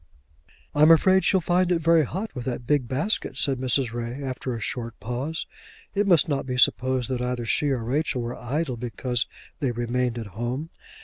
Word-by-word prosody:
"I'm 150 +2 +6
afraid 185 +3 +6
she'll 190 - +3
find 180 +2 +2
it 175 - +4
very 165 -1 +4
hot 195 - -5
with 125 -3 -6
that 125 -1 -3
big 140 -2 +1
basket," 145 - -1
said 135 -3 +2
Mrs. 130 -2 +1
Ray, 120 +3 -4
after 130 -1 -3
a - - -5
short 115 0 -4
pause. 125 +10 -3 0.5
It 205 0 +1
must 175 -3 +5
not 140 -3 -1
be 125 -1 -2
supposed 130 0 +3
that 125 -1 -1
either 125 -1 -2
she 145 +6 +1
or 130 -4 -1
Rachel 130 0 -1
were 120 +1 -4
idle 135 +1 -2
because 120 0 -2 0.3
they 135 - 0
remained 120 +1 -1
at 115 - -4
home. 125 - -3
130 Hz, 190 wpm, -25 LUFS, 120-155 Hz, 0.5 s, I'm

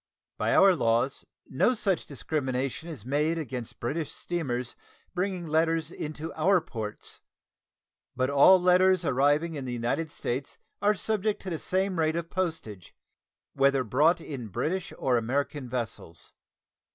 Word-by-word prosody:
By - - +2
our 195 -1 +7
laws 120 0 0 0.2
no 245 - +2
such 195 -5 0
discrimination 135 +1 -3
is 140 -10 -8
made 150 +5 +1
against 125 -6 -6
British 150 +6 -2
steamers 130 -8 -3 0.4
bringing 180 -1 -2
letters 160 0 +1
into 155 +1 -6
our 180 +4 +3
ports, 110 -10 -7 0.9
but 130 - +1
all 140 +7 +7
letters 180 0 +4
arriving 145 +5 +2
in 140 -4 -5
the 125 - -4
United 120 +7 -1
States 130 0 -4 0.2
are 210 +1 +3
subject 215 +1 -1
to 190 - -5
the 165 - -3
same 190 -1 -1
rate 160 0 +2
of 170 0 -4
postage, 155 - -4 0.6
whether 135 -1 +3
brought 150 +10 +3
in 135 -8 -6
British 175 - -2
or 130 -2 +2
American 130 +3 -2
vessels. 115 -9 -5
155 Hz, 140 wpm, -28 LUFS, 130-175 Hz, 0.9 s, our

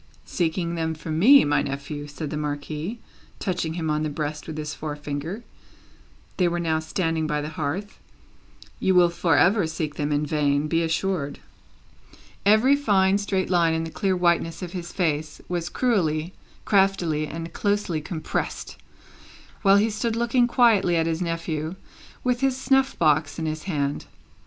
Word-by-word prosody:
"Seeking 170 0 -1
them 160 -1 -2
from 155 0 -4
me, 275 +9 +8
my 145 0 +2
nephew," 145 +2 -5
said 145 +1 -6
the - - -3
Marquis, 150 +6 -4 0.4
touching 170 -4 -2
him 160 -3 -1
on 150 0 0
the 155 - -1
breast 150 0 -4
with 155 -1 -6
his 150 0 -4
forefinger 150 +6 -5 0.9
they 180 - +3
were 175 0 -1
now 160 -2 0
standing 160 0 -1
by 150 -1 0
the 150 +1 -4
hearth 160 +7 -4 0.8
"you 190 - +2
will 175 -1 +6
for 170 -2 +2
ever 190 -1 +4
seek 155 -2 -4
them 145 0 -1
in 145 +1 +1
vain, 145 -1 +1
be 165 +2 +1
assured." 165 -2 -1 1.1
Every 220 +7 +6
fine 200 -8 +3
straight 190 -2 -1
line 170 -2 +3
in 160 - -1
the 165 - -6
clear 190 +1 0
whiteness 170 -1 +1
of 175 - -5
his 175 -2 -6
face, 155 -4 -1
was 175 -1 -2
cruelly, 175 -9 0 0.3
craftily, 185 -6 +2
and 165 +2 -6
closely 205 -6 0
compressed, 155 +1 -4 0.8
while 195 -1 +6
he 215 +2 +2
stood 220 +2 -1
looking 235 +1 +2
quietly 225 -8 +4
at 165 -1 +2
his 165 +1 -1
nephew, 165 -1 -3 0.5
with 250 -1 +1
his 270 -1 +2
snuff 270 0 +2
box 155 -2 +2
in 160 - -3
his 155 0 -4
hand. 145 -6 -2
165 Hz, 160 wpm, -24 LUFS, 155-195 Hz, 1.1 s, me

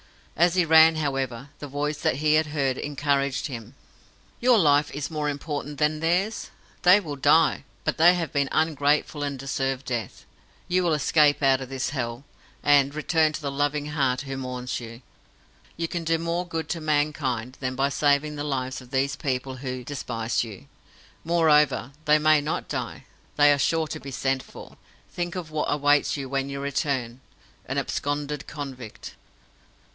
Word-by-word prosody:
As 175 +1 +3
he 180 -2 +3
ran, 160 0 +7
however, 135 -4 -2
the 145 - -6
voice 145 +2 -3
that - - +1
he 150 +2 +2
had 155 0 +3
heard 140 -3 0
encouraged 140 -2 0
him. 120 -2 -7 0.6
"Your 245 -1 +5
life 145 -5 +4
is 145 -1 -3
of - - -6
more 150 -1 -1
importance 145 0 -4
than 150 +2 +1
theirs. 180 +7 0 0.3
They 180 +3 +7
will 155 -7 -6
die, 145 +3 +3 0.2
but - - -2
they 175 +2 +7
have 170 -3 -3
been 140 -2 +1
ungrateful 150 -1 +1
and 140 -1 -2
deserve 135 0 -2
death. 120 -3 -4 0.4
You 180 +1 +2
will 170 -3 +1
escape 150 0 +3
out 135 -1 +4
of 130 - -7
this 135 -1 -2
Hell, 120 -2 -4 0.4
and 145 -1 +4
return 155 0 +2
to 155 - -5
the 140 - -2
loving 145 +1 -1
heart 135 -4 0
who 135 -1 -5
mourns 125 -1 -4
you. 115 +1 -10 0.7
You 165 0 -1
can 170 0 -4
do 165 0 +1
more 170 +2 -2
good 165 -1 -4
to 165 - -3
mankind 145 -5 -1
than 130 -1 -3
by 135 +1 +1
saving 145 +1 +1
the 145 - -4
lives 130 -3 -3
of 125 - -15
these 135 +1 0
people 130 -1 -3
who 130 -1 -5
despise 120 -4 -2
you. 105 -10 -10 0.6
Moreover, 150 -5 +3
they 150 0 +5
may 155 0 +4
not 150 +2 -3
die. - - -5 0.3
They 145 0 +6
are 140 - -1
sure 160 +3 +1
to - - -5
be 140 - -8
sent 135 0 -1
for. - - -13 0.3
Think 175 0 -4
of 170 -4 -6
what 155 -1 -1
awaits 145 0 +2
you 135 -1 -5
when 135 +1 -2
you 140 0 -5
return 135 -3 -2 0.5
an - - -3
absconded 145 0 -2
convict!" 135 -6 -8
145 Hz, 175 wpm, -25 LUFS, 135-155 Hz, 0.7 s, ran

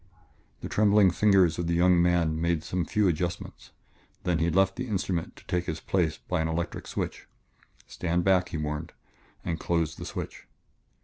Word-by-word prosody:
The - - -4
trembling 105 -2 +4
fingers 95 -4 +3
of 85 - -1
the 85 - +1
young 90 0 +4
man 85 -2 +2
made 85 -2 0
some 90 0 -2
few 105 +4 +1
adjustments, 85 +1 -3 0.5
then 90 -3 +1
he 85 +2 +2
left 95 +3 +2
the 125 0 -4
instrument 95 -5 -2
to - - -17
take 90 -1 -1
his 80 -1 -3
place 80 -4 0
by 90 -3 -2
an 80 - 0
electric 80 +1 -3
switch. - - -4 0.6
"Stand 85 0 -1
back," 90 -1 +3
he - - -4
warned, 75 +1 -4 0.5
and 85 -2 -2
closed 85 -2 -1
the - - -6
switch. - - -7
85 Hz, 175 wpm, -27 LUFS, 80-90 Hz, 0.6 s, trembling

